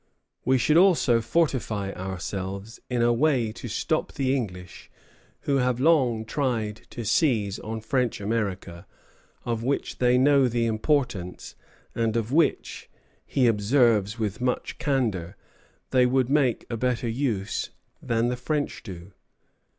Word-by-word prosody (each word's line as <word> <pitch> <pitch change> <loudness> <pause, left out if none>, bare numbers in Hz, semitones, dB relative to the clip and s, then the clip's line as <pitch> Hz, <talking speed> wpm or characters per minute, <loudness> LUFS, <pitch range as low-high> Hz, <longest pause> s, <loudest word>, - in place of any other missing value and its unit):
We 130 +1 +3
should 140 +6 +3
also 170 -11 +4
fortify 115 -8 0
ourselves, 95 +3 -5
"in 120 -2 +1
a 120 0 +4
way 125 -4 +2
to 120 - -8
stop 155 +8 -1
the 135 -2 0
English, 90 -8 -6 0.5
who 140 - +1
have 125 -2 +1
long 130 -7 +3
tried 110 -5 -1
to 120 - -7
seize 110 - +1
on 110 +1 -5
French 125 +1 -1
America, 100 -5 -3 0.6
of 115 -2 -2
which 135 +4 -2
they 125 0 +4
know 135 0 +4
the 120 -1 0
importance, 110 - -1 0.4
and 115 -1 0
of 115 +1 -2
which," 160 +3 0 0.4
he 130 - +2
observes 110 -1 +3
with 110 0 -3
much 125 0 -2
candor, 110 - -1 0.6
"they 125 -1 +4
would 130 0 +1
make 140 -5 +2
a 115 - -4
better 125 +1 -1
use 115 -5 -2 0.3
than 115 +1 0
the 125 - -1
French 145 +3 -2
do... 95 -3 -10
120 Hz, 135 wpm, -25 LUFS, 105-130 Hz, 0.6 s, also